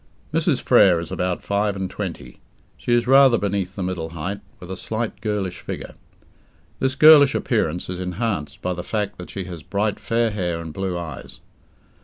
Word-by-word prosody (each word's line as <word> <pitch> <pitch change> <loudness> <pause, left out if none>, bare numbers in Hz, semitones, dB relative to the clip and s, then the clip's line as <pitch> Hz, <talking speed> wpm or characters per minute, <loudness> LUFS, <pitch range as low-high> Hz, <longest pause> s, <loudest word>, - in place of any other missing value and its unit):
Mrs. - - +2
Frere 90 -4 +5
is 85 - -7
about 90 -1 -2
five 100 0 0
and 95 -1 -2
twenty. 65 -8 -6 0.4
She - - -4
is 120 -1 +3
rather 135 -1 +6
beneath 100 -3 -2
the 95 - -3
middle 90 -3 -3
height, 85 +5 -4 0.2
with 90 0 -9
a - - -3
slight, 110 +4 -4
girlish 105 -4 -2
figure. - - -7 0.9
This 130 0 0
girlish 150 -3 +8
appearance 85 +3 0
is 90 0 -5
enhanced 90 -5 -3
by 90 - 0
the 90 - -5
fact 105 +1 -3
that 90 - -8
she 95 - -5
has 90 -3 -8
bright 100 +5 -1
fair 115 -1 0
hair 90 -5 -2
and 80 -2 -7
blue 95 0 -2
eyes. 80 -5 -7
95 Hz, 180 wpm, -22 LUFS, 90-110 Hz, 0.9 s, girlish